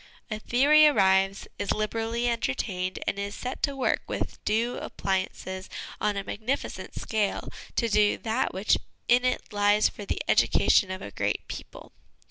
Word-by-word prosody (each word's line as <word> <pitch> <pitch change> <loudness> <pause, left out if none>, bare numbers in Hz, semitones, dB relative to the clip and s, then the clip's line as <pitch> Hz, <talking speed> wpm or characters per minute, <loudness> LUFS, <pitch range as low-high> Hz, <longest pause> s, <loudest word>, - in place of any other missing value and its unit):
A 215 - -2
theory 290 +7 +5
arrives, 195 -7 +3
is 205 -1 -1
liberally 225 +3 -1
entertained, 185 - -1
and 200 - -1
is 200 0 -4
set 255 +1 -5
to 280 -2 0
work 265 - +1
with - - -4
due 230 +3 +1
appliances 190 0 -3 0.3
on 210 -1 0
a 200 - -2
magnificent 225 +8 -4
scale 215 -3 -1 0.3
to 235 - +1
do 210 -1 +3
that 230 +3 -1
which 195 +3 +2 0.3
in 245 +1 +5
it 255 -3 -1
lies 205 +1 +4
for 205 - -9
the - - -3
education 195 - +4
of 185 0 -5
a 100 - -7
great - - -2
people. - - -9
210 Hz, 155 wpm, -27 LUFS, 195-240 Hz, 0.3 s, theory